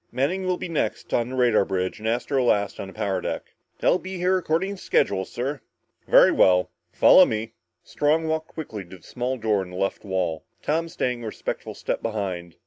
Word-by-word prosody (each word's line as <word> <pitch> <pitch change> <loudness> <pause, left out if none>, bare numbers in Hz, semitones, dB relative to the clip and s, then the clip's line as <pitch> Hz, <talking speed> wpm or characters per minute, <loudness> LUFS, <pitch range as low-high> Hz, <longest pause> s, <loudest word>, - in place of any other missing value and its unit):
Manning 180 +9 -1
will 180 -1 +1
be - - -5
next 165 -3 -2
on 120 0 +1
the 130 - -5
radar 120 -5 +4
bridge 95 0 -2
and 110 - -4
Astro 125 +3 0
last 100 -4 +1
on - - -5
the 95 - -11
power 95 -2 -1
deck." - - -5 0.3
"They'll 185 - +3
be 190 0 -6
here 180 +1 +2
according 185 +2 0
to - - -14
schedule, 95 -1 +1
sir." 135 +7 -4 0.5
"Very - - +7
well. 90 -1 +4 0.2
Follow - - +7
me." 110 +1 -2 0.3
Strong 155 +2 +1
walked 160 0 -1
quickly 115 -11 -7
to 95 +1 -12
the 85 - -25
small 125 +1 -3
door 110 -4 +1
in 95 - -7
the 90 - -10
left 95 +1 -2
wall, 95 -5 -2 0.2
Tom 165 +2 0
staying 125 -5 -2
a 115 - -5
respectful - - -5
step - - -3
behind. 95 -6 -4
120 Hz, 205 wpm, -24 LUFS, 95-155 Hz, 0.5 s, Very